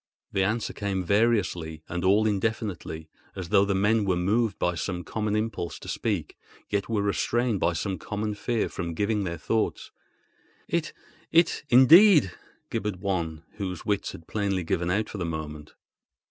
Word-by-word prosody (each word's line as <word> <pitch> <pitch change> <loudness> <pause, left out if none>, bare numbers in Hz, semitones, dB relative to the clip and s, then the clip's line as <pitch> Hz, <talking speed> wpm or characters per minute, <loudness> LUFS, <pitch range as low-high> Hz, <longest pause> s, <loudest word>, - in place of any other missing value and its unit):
The 95 - +1
answer 110 +4 -1
came 100 -3 -2
variously 90 -6 +1
and 90 +1 -3
all 100 +4 +4
indefinitely 100 -6 -2 0.3
as 90 -3 -6
though 100 -1 +5
the 100 -1 0
men 105 +3 +3
were 95 -2 +1
moved 105 +4 +1
by 90 - 0
some 90 +1 -3
common 105 +1 -2
impulse 110 -6 -2
to - - -12
speak, - - -2 0.4
yet 100 -2 -1
were 105 -3 0
restrained 115 +2 0
by 85 - +2
some 95 +3 -3
common 105 0 -3
fear 115 +2 -1
from 85 -3 -5
giving 105 +1 0
their 85 -1 -3
thoughts. 110 +7 -1 0.8
"It—it—indeed!" 160 - +4 0.4
gibbered 105 -1 -2
one, 85 -5 -2
whose 95 -4 -4
wits 100 -1 -1
had 80 - -11
plainly 100 -3 -1
given 85 +1 -1
out 105 +4 +1
for 105 - -7
the - - -1
moment. 75 -2 -6
100 Hz, 155 wpm, -26 LUFS, 90-110 Hz, 0.8 s, though